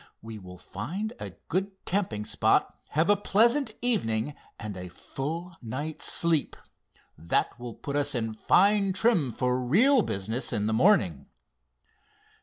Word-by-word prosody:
We 110 -1 -8
will 90 -1 -11
find 175 - -5
a - - -6
good 190 +3 -1
camping 175 - -1
spot, - - +2 0.2
have 160 - +4
a 205 - +5
pleasant 235 +7 +2
evening, 145 - +1 0.3
and 105 -3 -6
a 90 0 -6
full 165 - -6
night's 140 +7 -4
sleep. 165 -3 +1 0.6
That 85 +8 0
will 120 -2 -7
put 140 - -5
us 145 -1 0
in 115 -2 -2
fine 195 - +3
trim 190 - +2
for 125 +2 0
real 235 - +5
business 110 - -2
in 105 - 0
the 110 - 0
morning." 110 - +3
145 Hz, 140 wpm, -28 LUFS, -, 0.6 s, a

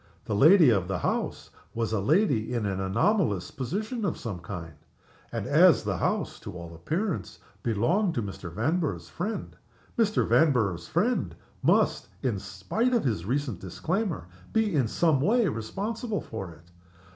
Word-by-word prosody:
The - - -2
lady 155 - +7
of 95 -5 +1
the 95 -1 -1
house - - -2 0.2
was 115 -1 -1
a 110 - +1
lady 135 - +2
in 115 -3 -1
an 95 -1 -1
anomalous 105 - +1
position 215 - -3
of 185 - -1
some 100 -6 -5
kind. 85 -2 -7 0.6
And - - -3
as - - +5
the - - -1
house, - - -1
to - - -8
all 85 -1 -8
appearance, 155 - -3 0.2
belonged 165 - +1
to 120 - 0
Mr. 95 -3 -7
Vanborough's 155 - -1
friend, 210 +6 -4 0.4
Mr. 215 -2 +2
Vanborough's 110 - +2
friend - - 0 0.3
must - - +2 0.2
(in 115 -7 0
spite 160 - -1
of 235 - +2
his 105 -10 -1
recent 125 -4 -1
disclaimer) 165 - -2 0.3
be 220 -3 +1
in 135 -6 +2
some 155 +2 +2
way 225 - +3
responsible 205 - -3
for 95 -5 -6
it. 85 +1 -16
125 Hz, 155 wpm, -27 LUFS, -, 0.6 s, lady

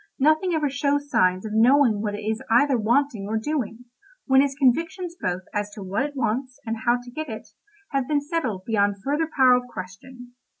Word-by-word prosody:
Nothing 315 +5 +2
ever 305 -2 +1
shows 285 +1 -1
signs 185 -2 +2
of 215 - -5
knowing 235 -1 +4
what 205 -1 -2
it 205 - -7
is 220 +1 -2
either 265 +4 +4
wanting 235 -1 +1
or 220 +1 -1
doing, 245 -2 -3 0.4
when 265 0 +5
its 275 -1 0
convictions 330 +7 0
both 180 +1 -2
as 205 0 -2
to 205 - -7
what 195 +4 -2
it 285 +1 -3
wants, 255 +1 -2
and 225 0 -2
how 240 +1 +4
to 245 0 -12
get 310 +3 -5
it, 220 -1 -8 0.4
have 275 -3 -1
been 295 -1 +2
settled 280 - -3
beyond 205 -3 +1
further 300 +3 0
power 260 -2 +6
of 250 0 +1
question. 245 +7 -10
250 Hz, 200 wpm, -24 LUFS, 215-285 Hz, 0.4 s, power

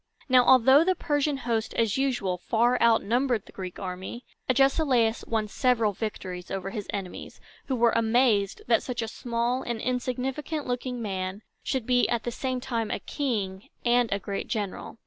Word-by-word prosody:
Now, 255 -2 +6
although 265 +4 +7
the 370 +2 +2
Persian 290 -2 0
host, 230 -3 -2
as 225 -3 +1
usual, 245 -10 0
far 235 +6 +2
outnumbered 235 0 +2
the - - -15
Greek 185 -2 -7
army, 190 +5 -6 0.2
Agesilaus 260 -3 +3
won 220 -2 0
several 230 -2 +1
victories 185 -4 -5
over 195 0 -4
his 210 -2 -5
enemies, 195 -3 -6 0.3
who 265 - 0
were 235 -1 +4
amazed 225 -3 +2
that 235 -1 +3
such 245 -2 -3
a - - -3
small 235 +2 -1
and 235 -2 -3
insignificant 255 +5 -2
looking 245 -1 -3
man 190 0 -4 0.2
should 260 -4 -2
be 245 0 +3
at 235 -1 0
the 240 - -3
same 255 +1 -2
time 230 -3 -2
a - - -1
king 205 -9 -3 0.2
and 240 -1 +3
a 200 - +2
great 200 0 -4
general. 205 +1 -4
235 Hz, 165 wpm, -27 LUFS, 210-255 Hz, 0.3 s, although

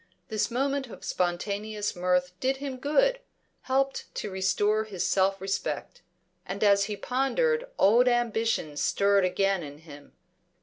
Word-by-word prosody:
This 215 +1 0
moment 270 +2 -1
of 230 - -11
spontaneous 205 +4 -2
mirth 180 0 +1
did 265 +1 0
him 270 -1 -5
good, - - +2 0.5
helped 270 +1 +1
to 210 - -4
restore 205 +3 +1
his 195 -5 -3
self 195 0 +2
respect. 195 +1 -3 0.4
And 200 +2 -4
as 200 -1 +5
he 210 0 -4
pondered 470 - 0
old 235 +6 +5
ambitions 225 -10 0
stirred 200 -1 +3
again 195 +1 +1
in 145 -2 -8
him. 145 -2 -14
205 Hz, 135 wpm, -27 LUFS, 190-255 Hz, 0.5 s, as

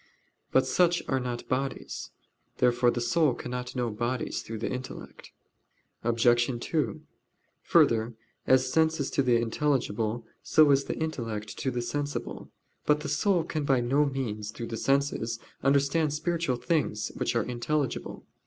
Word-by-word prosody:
But 130 0 +4
such 175 +5 +2
are 130 - +1
not 125 -1 -4
bodies. 135 +1 -3 0.5
Therefore 120 0 +3
the 120 - -1
soul 125 +3 +2
cannot 125 +1 -5
know 120 -2 -1
bodies 120 +3 -2
through 115 - -6
the 110 - -3
intellect. 130 0 -7 0.7
Obj. 120 +1 +4 0.2
2: 130 -5 -1 0.6
Further, 115 0 +3 0.3
as 130 0 +4
sense 160 0 +3
is 140 - -2
to - - +2
the 125 -3 +3
intelligible, 115 -2 0 0.2
so 155 -2 +5
is 140 0 +3
the - - -3
intellect 115 -10 -4
to 135 - 0
the 120 -1 -2
sensible. 145 +4 -4 0.4
But 150 0 +3
the 150 - -4
soul 175 +4 +2
can 155 -2 -3
by 135 -3 +3
no 135 +5 +2
means, 110 -6 -3
through 115 +2 -6
the 115 - -3
senses, 135 -4 0 0.2
understand 140 +2 +2
spiritual 165 -3 0
things, 120 -4 -1
which - - -1
are 115 - +2
intelligible. 125 +3 -2
130 Hz, 150 wpm, -28 LUFS, 120-145 Hz, 0.7 s, so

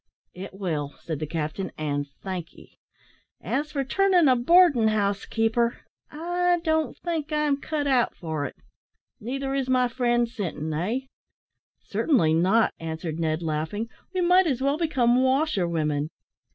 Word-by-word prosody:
"It 190 +1 -8
will," 155 -7 -3
said 160 -4 -4
the 155 - -3
captain, 160 +4 -3
"and 145 -2 -2 0.2
thank 185 -4 -5
'ee. - - -18 0.6
As 295 +3 -2
for 275 -2 -1
turning 365 +3 +3
a 255 - +5
boardin' 285 -2 +5
house 205 -2 0
keeper, 235 +1 0 0.3
I 350 +3 0
don't 315 -2 0
think 325 -3 -3
I'm 300 -2 +1
cut 305 -2 -2
out 260 -4 +2
for 160 -4 -3
it. - - -6 0.6
Neither 270 +4 -3
is 270 -2 -1
my 255 -1 +3
friend 240 -1 +1
Sinton, 160 -9 -4
eh?" 200 +12 -1 0.8
"Certainly 210 - +2
not," 190 +8 +3
answered 160 0 -5
Ned, 160 0 -1
laughing: 160 +8 -2 0.2
"we 370 -1 -1
might 360 +1 +5
as 265 -5 0
well 280 +3 0
become 255 -7 +2
washerwomen." 170 - +1
235 Hz, 145 wpm, -25 LUFS, -, 0.8 s, a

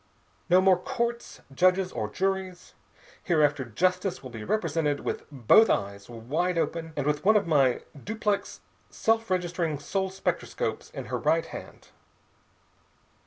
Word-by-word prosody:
"No 180 +1 +6
more 190 -1 +4
courts, 235 -3 -3
judges, 185 +4 +3
or 105 - -3
juries. 190 - -3 0.5
Hereafter 150 -5 +2
justice 180 - 0
will 130 - -8
be 110 -3 -7
represented 155 - 0
with - - -4
both 140 - +5
eyes 100 +1 -2
wide 150 +10 -2
open 165 -1 -2
and 140 - -1
with 150 0 0
one 215 +3 +5
of 205 - 0
my 140 -6 +2 0.2
duplex 210 -1 -2 0.3
self 225 0 0
registering 175 -4 -1
soul 190 +7 -2
spectroscopes 190 +1 -3
in - - -7
her - - -3
right - - +2
hand. - - -10
175 Hz, 135 wpm, -27 LUFS, 145-195 Hz, 0.5 s, No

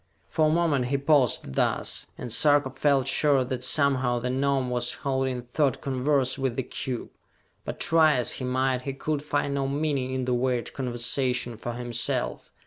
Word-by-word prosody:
For 160 -1 +2
a - - +2
moment 155 -6 +2
he 140 +3 0
paused 140 - +2
thus, - - -1
and 120 - -3
Sarka 145 0 +4
felt 135 0 +1
sure 140 -1 +3
that 125 -1 -4
somehow 130 -2 +2
the 125 +1 -2
Gnome 135 -1 0
was 120 0 -1
holding 130 -2 -2
thought 135 +2 0
converse 135 0 0
with 130 -3 -1
the 130 - -1
cube; 125 -1 -5 0.5
but, - - -5
try 160 -2 +4
as 125 -2 +1
he - - -4
might, 130 0 0
he 135 +1 -4
could 145 +2 -2
find 145 -1 -1
no 135 -1 -1
meaning 140 -2 -1
in 130 -1 -2
the 125 - 0
weird 125 -1 -1
conversation 125 -1 -1
for 120 +2 -5
himself. 120 0 -2
130 Hz, 175 wpm, -26 LUFS, 125-140 Hz, 0.5 s, Sarka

